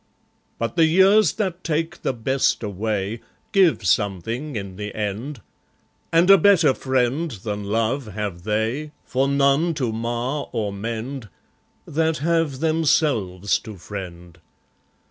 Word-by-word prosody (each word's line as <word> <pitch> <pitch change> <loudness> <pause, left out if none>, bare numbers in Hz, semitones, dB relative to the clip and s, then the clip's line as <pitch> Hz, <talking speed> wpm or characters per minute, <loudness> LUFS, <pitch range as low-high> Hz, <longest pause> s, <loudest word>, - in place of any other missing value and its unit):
But 115 +6 -3
the 165 -1 +6
years, 190 +6 +5
that 185 -4 -3
take 165 +1 -2
the - - 0
best 130 +1 0
away, 105 +1 -2 0.3
Give 185 - +3
something 110 - -1
in 100 -3 -5
the 105 +1 -6
end; 110 +6 -4 0.7
And 165 +2 +4
a 195 - +8
better 180 -9 +5
friend 130 +5 0
than 105 -3 -5
love 115 +5 -1
have 100 -4 -5
they, 110 - -2
For 135 +2 0
none 140 +4 +2
to 130 -6 -1
mar 120 +5 -3
or 105 -3 -2
mend, 115 +3 -5 0.6
That 160 +1 0
have 160 -3 0
themselves 145 - +1
to 110 -3 -10
friend. 90 -3 -9
125 Hz, 125 wpm, -22 LUFS, 105-155 Hz, 0.7 s, a